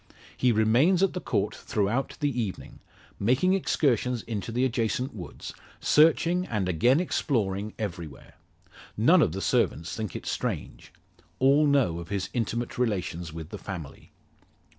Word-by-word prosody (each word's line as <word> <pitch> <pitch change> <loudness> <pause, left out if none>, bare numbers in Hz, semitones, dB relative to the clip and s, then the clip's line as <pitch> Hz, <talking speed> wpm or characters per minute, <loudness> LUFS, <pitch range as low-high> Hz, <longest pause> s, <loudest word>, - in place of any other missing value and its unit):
He 125 - +2
remains 120 - +3
at 195 - +2
the - - -4
Court - - -1
throughout 110 +6 -2
the 140 -4 0
evening, 100 -5 -6 0.4
making 130 - +3
excursions 125 - +1
into 105 -2 -4
the 125 +3 +1
adjacent 125 +2 -1
woods, 90 -5 -8 0.3
searching, 165 +3 +4
and 105 -5 -1
again 120 - +3
exploring 105 - -1
everywhere. 85 -7 -6 0.6
None - - +5
of - - +3
the 95 +4 -4
servants 80 -1 0
think 110 -2 -5
it - - -6
strange; - - -4 0.5
all 140 +3 +4
know 130 - +2
of 85 - -9
his 100 -2 -2
intimate 120 +1 -2
relations 90 -8 -2
with 80 0 -8
the 105 - -7
family. 90 -8 -8
115 Hz, 140 wpm, -27 LUFS, 95-135 Hz, 0.6 s, None